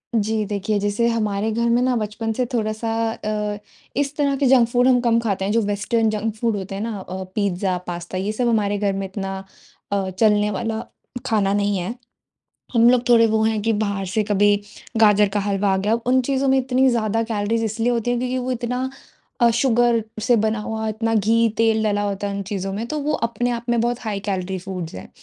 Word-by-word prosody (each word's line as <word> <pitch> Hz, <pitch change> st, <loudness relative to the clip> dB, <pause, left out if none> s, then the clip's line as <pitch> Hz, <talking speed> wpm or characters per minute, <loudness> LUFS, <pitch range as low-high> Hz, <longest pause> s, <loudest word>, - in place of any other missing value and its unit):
जी। 215 Hz, 0 st, +1 dB
देखिए 205 Hz, +1 st, -1 dB
जैसे 205 Hz, +3 st, +1 dB
हमारे 215 Hz, -2 st, 0 dB
घर 235 Hz, +2 st, 0 dB
में 240 Hz, +1 st, +3 dB
ना 255 Hz, 0 st, +2 dB
बचपन 220 Hz, 0 st, -2 dB
से 250 Hz, +3 st, 0 dB
थोड़ा-सा 220 Hz, 0 st, -1 dB, 0.2 s
अ, 210 Hz, -1 st, -3 dB, 0.4 s
इस 285 Hz, +1 st, -1 dB
तरह 280 Hz, -2 st, +2 dB
के 280 Hz, -, +1 dB
जंक 250 Hz, -2 st, +5 dB
फूड 245 Hz, +1 st, +3 dB
हम 255 Hz, -1 st, +5 dB
कम 230 Hz, -1 st, +3 dB
खाते 200 Hz, -4 st, -1 dB
हैं 200 Hz, -, 0 dB
जो 230 Hz, +2 st, +3 dB
वेस्टर्न 210 Hz, +2 st, 0 dB
जंक 215 Hz, +1 st, -2 dB
फूड 225 Hz, 0 st, 0 dB
होते 195 Hz, 0 st, -6 dB
हैं 195 Hz, -, -4 dB
ना 225 Hz, -1 st, -3 dB
अ, 190 Hz, 0 st, -6 dB
पिज्जा, 190 Hz, -2 st, 0 dB
पास्ता 175 Hz, +1 st, -5 dB
ये 195 Hz, +3 st, -1 dB
सब 240 Hz, +3 st, -1 dB
हमारे 205 Hz, -3 st, +1 dB
घर 200 Hz, -1 st, 0 dB
में 195 Hz, 0 st, -3 dB
इतना 195 Hz, 0 st, -5 dB, 0.5 s
अ, 195 Hz, -2 st, 0 dB
चलने 210 Hz, +2 st, +2 dB
वाला 220 Hz, +2 st, -2 dB, 0.5 s
खाना 205 Hz, -5 st, +1 dB
नहीं 205 Hz, 0 st, +1 dB
है। 185 Hz, +5 st, -3 dB, 0.8 s
हम 235 Hz, 0 st, +6 dB
लोग 245 Hz, -1 st, +2 dB
थोड़े 230 Hz, -1 st, +6 dB
वो 220 Hz, 0 st, +1 dB
हैं 220 Hz, -1 st, +1 dB
कि 225 Hz, +1 st, +1 dB
बाहर 200 Hz, -2 st, -1 dB
से 200 Hz, +4 st, 0 dB
कभी 205 Hz, 0 st, +3 dB, 0.4 s
गाजर 210 Hz, -2 st, +5 dB
का 205 Hz, +1 st, -1 dB
हलवा 200 Hz, 0 st, 0 dB
आ -, -, +2 dB
गया 205 Hz, +3 st, +1 dB
उन 260 Hz, +1 st, +4 dB
चीज़ों 270 Hz, 0 st, +1 dB
में 265 Hz, 0 st, +4 dB
इतनी 260 Hz, 0 st, +2 dB
ज़्यादा 225 Hz, -1 st, 0 dB
कैलोरीज 225 Hz, 0 st, -1 dB
इसलिए 225 Hz, +2 st, 0 dB
होती 235 Hz, 0 st, -1 dB
है। 245 Hz, -, +1 dB
क्योंकि 255 Hz, +1 st, -1 dB
वो 255 Hz, 0 st, -3 dB
इतना 250 Hz, +1 st, -2 dB, 0.5 s
अ, 235 Hz, -1 st, +6 dB
शुगर 235 Hz, -1 st, +2 dB, 0.2 s
से 245 Hz, +2 st, +3 dB
बना 220 Hz, 0 st, +1 dB
हुआ, 220 Hz, +1 st, -3 dB
इतना 225 Hz, +1 st, -1 dB
घी-तेल 225 Hz, +1 st, +2 dB
डाला 205 Hz, -1 st, +1 dB
होता 205 Hz, 0 st, -2 dB
है 200 Hz, -, -4 dB
उन 200 Hz, -, -3 dB
चीज़ों 195 Hz, -1 st, -3 dB
में 215 Hz, +4 st, -3 dB
तो 305 Hz, -, -2 dB
वो 300 Hz, +2 st, 0 dB, 0.2 s
अपने 240 Hz, +2 st, -1 dB
आप 235 Hz, -1 st, -3 dB
में 235 Hz, -1 st, +2 dB
बहुत 240 Hz, +1 st, -1 dB
हाई-कैलोरी 195 Hz, -4 st, -3 dB
फूड्स 180 Hz, -3 st, -6 dB
है। 95 Hz, -, -9 dB
220 Hz, 215 wpm, -22 LUFS, 200-235 Hz, 0.8 s, हम